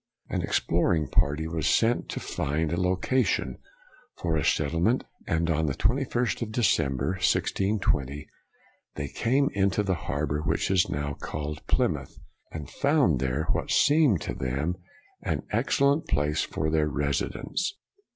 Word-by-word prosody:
An - - -1
exploring 80 -3 +1
party 75 +4 +1
was 80 -3 -1
sent 115 +2 +2
to - - -3
find 75 +2 -2
a 85 - 0
location 95 +8 0 0.6
for 80 -2 -1
a 75 - 0
settlement, 85 - +1 0.2
and 80 0 +1
on 80 -1 +1
the 70 - -1 0.4
aist 125 0 0
of 110 -2 -3
December, 90 - +1
1620, 95 -6 0 0.7
they 70 -1 -3
came 130 - +1
into 100 +1 +1
the 95 -2 +1 0.2
harbor 75 0 -1
which 90 - 0
is 95 -2 +3
now 70 0 -2
called 75 +1 -5
Plymouth, - - 0 0.3
and 75 -4 -6
found 140 - +2
there 65 +3 0
what - - -1
seemed 145 - +4
to - - -3
them 70 +7 -2 0.5
an - - -2
excellent 140 +2 +2
place 75 +2 +1
for 80 0 -2
their 80 -1 +2
residence. 75 - -2
80 Hz, 140 wpm, -27 LUFS, 75-105 Hz, 0.7 s, seemed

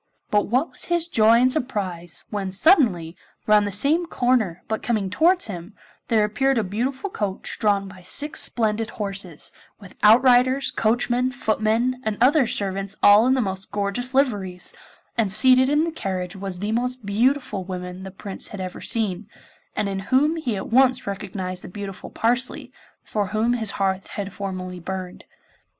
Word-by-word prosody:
But 210 -1 +2
what 255 +8 0
was - - -3
his 345 -1 0
joy 225 -7 +4
and 255 +1 +4
surprise 185 - -1
when 200 -3 -3
suddenly, 190 - +3 0.3
round 210 -1 +4
the - - -3
same 300 - +1
corner, 245 - 0
but 220 0 -2
coming 210 -5 -1
towards 350 - +3
him, 185 0 -7 0.3
there 220 -3 +3
appeared 265 +5 0
a 225 - +1
beautiful 255 - -3
coach 200 - -4
drawn 200 -2 +1
by 185 -1 -13
six 285 - -1
splendid 220 -1 0
horses, 195 -5 -5 0.3
with 200 -3 -13
outriders, 250 +4 +5
coachmen, 245 +3 +1
footmen 235 +1 0
and 215 -3 -2
other 265 +2 +4
servants 195 -1 -2
all 205 +4 +7
in 260 - +3
the 260 - +1
most 190 -2 -4
gorgeous 205 +6 -1
liveries, 200 -10 +1 0.5
and 210 -4 +1
seated 255 +5 +5
in 295 +2 +2
the 335 - -2
carriage 185 - -4
was 195 -1 -5
the 205 +4 -3
most 250 0 -2
beautiful 230 0 0
woman 180 0 -7
the 190 - -7
Prince 195 +1 -3
had 205 - -8
ever 185 -1 -6
seen, 210 -3 -1 0.5
and 210 - -1
in 195 -1 -3
whom 295 +5 +3
he 250 -10 -3
at - - -6
once 255 +1 +3
recognised 190 -2 -5
the - - -8
beautiful 195 0 -8
Parsley, 245 +3 0 0.3
for 205 -2 -2
whom 215 +4 0
his 225 -3 +2
heart 190 -1 -1
had 200 -2 -6
formerly 185 -2 -5
burned. 185 +1 -7
215 Hz, 165 wpm, -23 LUFS, 195-250 Hz, 0.5 s, all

